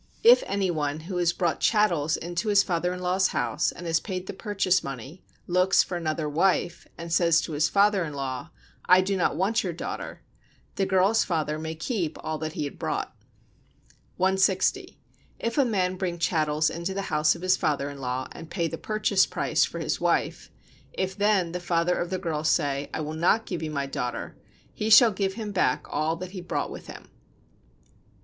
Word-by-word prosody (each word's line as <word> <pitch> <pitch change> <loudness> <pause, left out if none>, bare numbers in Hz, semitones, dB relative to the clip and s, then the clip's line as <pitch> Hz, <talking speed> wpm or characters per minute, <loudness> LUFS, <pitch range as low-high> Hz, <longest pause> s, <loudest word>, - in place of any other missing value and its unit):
If 475 +2 +8
any 195 -2 0
one, 150 -1 -2
who 180 +3 -5
has 175 -1 +2
brought 170 -1 -1
chattels 175 -9 +2
into 175 +5 -4
his 200 -1 +5
father 175 0 -1
in 180 0 -5
law's 185 +1 +2
house, - - -1
and 175 - -10
has 165 -1 +2
paid 185 -2 -5
the - - -6
purchase 190 -3 0
money, 135 +5 -8 0.2
looks 185 +2 +3
for 180 - -5
another 155 -2 -2
wife, 175 +2 0
and 170 0 -5
says 170 -1 +4
to - - -6
his 150 0 +1
father 200 -1 +3
in 150 -3 -5
law: 135 +2 -4 0.4
"I 180 +1 +7
do 195 +1 -1
not 180 - +1
want 205 +6 +1
your 180 -3 -3
daughter," 165 - -6 0.5
the 195 - -1
girl's 190 +4 +3
father 155 -3 -2
may 160 0 -5
keep 170 - -3
all 155 -1 -3
that 155 0 -4
he 155 - -3
had 145 - -6
brought. - - -3 1.0
160. 190 0 +1 0.4
If 230 +5 -2
a 275 - +5
man 185 -5 0
bring 180 -2 -2
chattels 155 -2 +1
into 170 +3 -4
the 195 - -2
house 155 +2 +3
of 170 - -10
his 185 0 +4
father 145 -2 -1
in 140 -1 -8
law, 130 0 -3
and 165 - -10
pay 170 -2 -1
the 165 - -6
"purchase 215 -2 +2
price" - - +1
[for - - -7
his - - -2
wife]: - - 0 0.4
if 190 0 -2
then 205 -4 +2
the 180 - -3
father 175 0 +1
of 175 - -2
the 185 - -1
girl 165 -4 -3
say: 145 -3 0
"I - - -3
will 155 0 -4
not 175 +8 +2
give 175 -4 -4
you 160 - -3
my 140 -2 -2
daughter," 125 -3 -4 0.4
he 215 - -2
shall 225 +1 +8
give 195 -1 -1
him 215 -2 -5
back 190 -2 +1
all 160 +2 0
that 180 +2 -7
he 190 -2 -7
brought 175 - -3
with - - -9
him. - - -10
175 Hz, 200 wpm, -26 LUFS, 155-190 Hz, 1.0 s, If